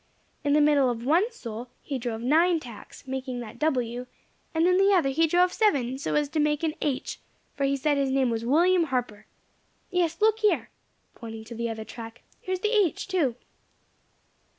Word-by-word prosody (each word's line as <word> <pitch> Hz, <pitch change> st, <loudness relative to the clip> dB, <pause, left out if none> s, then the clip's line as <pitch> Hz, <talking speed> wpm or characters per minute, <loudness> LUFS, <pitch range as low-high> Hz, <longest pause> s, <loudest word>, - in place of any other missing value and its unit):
In 285 Hz, -, +2 dB
the 300 Hz, -, +5 dB
middle 290 Hz, -3 st, +4 dB
of 235 Hz, -1 st, -4 dB
one 350 Hz, -, +3 dB
sole 235 Hz, -, -7 dB
he 275 Hz, -3 st, -4 dB
drove 230 Hz, -2 st, -4 dB
nine 330 Hz, +6 st, +3 dB
tacks, 240 Hz, -7 st, -12 dB
making 260 Hz, -1 st, -4 dB
that 235 Hz, +1 st, -10 dB
W., 250 Hz, -5 st, -1 dB, 0.4 s
and 325 Hz, 0 st, +2 dB
in 365 Hz, 0 st, +4 dB
the 390 Hz, +1 st, +4 dB
other 330 Hz, -7 st, +3 dB
he 325 Hz, +4 st, +2 dB
drove 355 Hz, +2 st, +3 dB
seven, 270 Hz, -, +1 dB
so -, -, -2 dB
as 295 Hz, -1 st, +2 dB
to 310 Hz, -, -2 dB
make 300 Hz, +1 st, +1 dB
an 315 Hz, -2 st, +1 dB
H.; 270 Hz, -3 st, -2 dB, 0.3 s
for 280 Hz, -, -1 dB
he 275 Hz, 0 st, +1 dB
said 290 Hz, +1 st, +1 dB
his 275 Hz, -1 st, +1 dB
name 265 Hz, -2 st, +2 dB
was 225 Hz, 0 st, -2 dB
William 340 Hz, +7 st, +3 dB
Harper. 250 Hz, -7 st, -3 dB, 0.6 s
Yes, 340 Hz, -3 st, 0 dB
look 440 Hz, +1 st, +3 dB
here," 425 Hz, -2 st, +1 dB, 0.4 s
pointing 225 Hz, -2 st, -8 dB
to 230 Hz, -, -10 dB
the 235 Hz, 0 st, -3 dB
other 220 Hz, -1 st, -5 dB
track, 230 Hz, +1 st, -10 dB, 0.2 s
"here 370 Hz, -, -4 dB
is 370 Hz, -, -3 dB
the 425 Hz, 0 st, +1 dB
H., 395 Hz, -7 st, +1 dB
too." 330 Hz, -11 st, +1 dB
280 Hz, 195 wpm, -26 LUFS, 245-335 Hz, 0.6 s, the